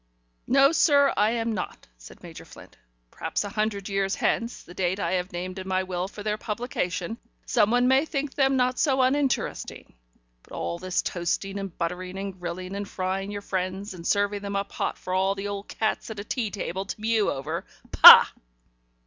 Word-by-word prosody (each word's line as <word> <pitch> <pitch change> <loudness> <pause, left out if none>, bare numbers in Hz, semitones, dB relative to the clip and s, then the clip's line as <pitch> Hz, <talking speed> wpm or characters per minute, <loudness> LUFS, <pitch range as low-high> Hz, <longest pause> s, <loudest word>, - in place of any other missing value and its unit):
"No, 275 +2 +5
sir, 285 -4 +4
I 210 +2 +3
am 230 -1 -1
not," 185 -4 -6
said - - -14
Major - - -10
Flint. - - -15 0.4
"Perhaps - - -3
a 205 - -5
hundred 205 -1 -2
years 195 0 -1
hence 235 0 -1
the 175 - -13
date 185 +1 -1
I - - -1
have 180 0 -1
named 185 +2 -5
in 185 - -7
my 190 0 0
will 185 0 -3
for 205 +1 -10
their 210 0 -2
publication 215 -3 -3 0.3
someone 245 +2 +3
may 265 +3 +4
think 290 -3 -3
them 270 -1 +2
not 255 0 +1
so 265 -3 +3
uninteresting. 270 0 -1 0.5
But - - -18
all 85 0 -4
this 185 -1 -1
toasting 195 +3 -2
and 195 -3 -7
buttering 180 +2 -4
and 195 -1 -6
grilling 180 +2 -5
and 200 0 -5
frying 190 +1 -3
your 205 0 -6
friends, 190 +2 -3
and 170 -2 -7
serving 205 0 +1
them 200 0 -5
up 200 0 -2
hot - - -3
for 185 - -6
all 190 +1 +1
the 200 +1 -5
old 200 0 -6
cats 220 +1 -2
at 220 -2 -7
a - - -4
tea 225 0 -2
table 190 -2 -4
to 200 - -6
mew 220 -1 +1
over 150 +5 -4 0.3
Pah!" - - +11
200 Hz, 190 wpm, -25 LUFS, 185-225 Hz, 0.5 s, Pah